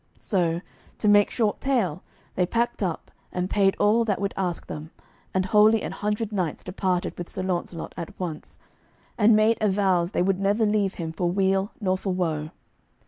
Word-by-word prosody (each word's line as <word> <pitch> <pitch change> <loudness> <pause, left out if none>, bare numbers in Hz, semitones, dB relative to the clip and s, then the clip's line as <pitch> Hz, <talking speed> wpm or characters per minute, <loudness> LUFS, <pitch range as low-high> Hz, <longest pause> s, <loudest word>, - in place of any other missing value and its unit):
So, 175 -4 0 0.4
to 210 - -1
make 205 0 +6
short 220 -4 0
tale, 210 - 0 0.3
they 180 -1 +1
packed 235 +3 -1
up, 180 -5 -3 0.2
and 180 +1 -2
paid 195 -2 +3
all 215 +3 +4
that 205 -3 0
would 200 0 -1
ask 180 -3 -2
them, 155 +1 -7 0.4
and 185 0 0
wholly 215 +2 +5
an - - -3
hundred 210 +1 -2
knights 180 -7 -2
departed 185 -1 -1
with 175 - -5
Sir 185 - -5
Launcelot 175 -2 -3
at 170 -2 -7
once, 170 -4 -6 0.6
and 215 0 +5
made 215 +2 +3
avows 190 -4 +2
they 180 - 0
would 190 0 +1
never 205 +3 +2
leave 210 -2 +1
him 165 -2 -4
for 175 +2 -1
weal 195 +2 +1
nor 185 -3 0
for 195 - -2
woe. 160 -4 -1
190 Hz, 180 wpm, -25 LUFS, 180-210 Hz, 0.6 s, make